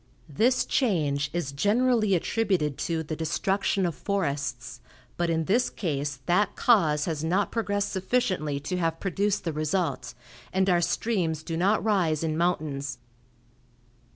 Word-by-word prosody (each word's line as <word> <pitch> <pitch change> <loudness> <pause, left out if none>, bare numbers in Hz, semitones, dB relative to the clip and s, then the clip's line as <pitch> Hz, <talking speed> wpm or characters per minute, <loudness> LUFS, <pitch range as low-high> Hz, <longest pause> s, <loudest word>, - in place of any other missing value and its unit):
This 235 - +2
change 150 - +1
is 170 -5 -2
generally 215 - +2
attributed 180 -6 0
to 165 -1 -1
the 155 0 -4
destruction 190 +4 0
of 170 - -1
forests, 140 -10 -3 0.4
but 175 -1 0
in 165 -1 0
this 235 +8 +2
case 145 -5 -3
that 200 +3 +2
cause 155 -11 +3
has 160 -3 -3
not 185 +5 +1
progressed 205 -3 -1
sufficiently 185 - 0
to 180 +5 -3
have 165 -2 -1
produced 200 +2 0
the 165 - -2
result, 155 -4 -2 0.4
and 190 0 +1
our 175 -1 +3
streams 170 -5 -1
do 165 - -4
not 195 +6 +2
rise 175 -8 +1
in 155 -1 -1
mountains. 150 -6 -1
170 Hz, 140 wpm, -27 LUFS, 150-200 Hz, 0.4 s, cause